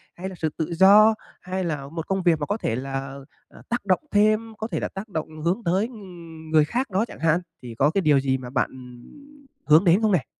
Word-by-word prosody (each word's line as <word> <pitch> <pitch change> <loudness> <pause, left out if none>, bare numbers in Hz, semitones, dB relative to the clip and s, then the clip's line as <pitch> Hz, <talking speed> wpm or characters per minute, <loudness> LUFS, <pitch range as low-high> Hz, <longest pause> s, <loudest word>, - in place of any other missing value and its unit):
hay 185 +2 -6
là 190 - -9
sự 160 -2 -2
tự 165 +1 -3
do, 205 +5 +7 0.3
hay 185 +1 -3
là 150 -5 -3
một 165 +2 -6
công 195 -1 -1
việc 170 -3 +3
mà 145 - -2
có 205 - -2
thể 115 - -2
là, 135 +1 -5 0.3
ờ, - - -17
tác 240 -3 -2
động 185 -3 +2
thêm, 215 +2 +2
có 220 - -4
thể - - -3
là - - -2
tác 195 +3 -8
động 160 -5 -3
hướng 175 +8 -1
tới, 190 +6 +1
ừm, 170 -8 -12
người 155 -1 +5
khác 245 - -2
đó 195 +4 +1
chẳng - - -12
hạn, 165 +1 +2 0.2
thì 120 -2 -8
có 140 +6 +3
cái 195 +5 0
điều 150 -5 +4
gì 135 -1 0
mà 125 -1 -9
bạn, - - 0
ừm, 130 - -15 0.2
hướng 155 +4 +6
đến 180 +4 +4
không 215 -1 +2
nè? 175 -9 +1
175 Hz, 250 wpm, -24 LUFS, 150-205 Hz, 0.3 s, do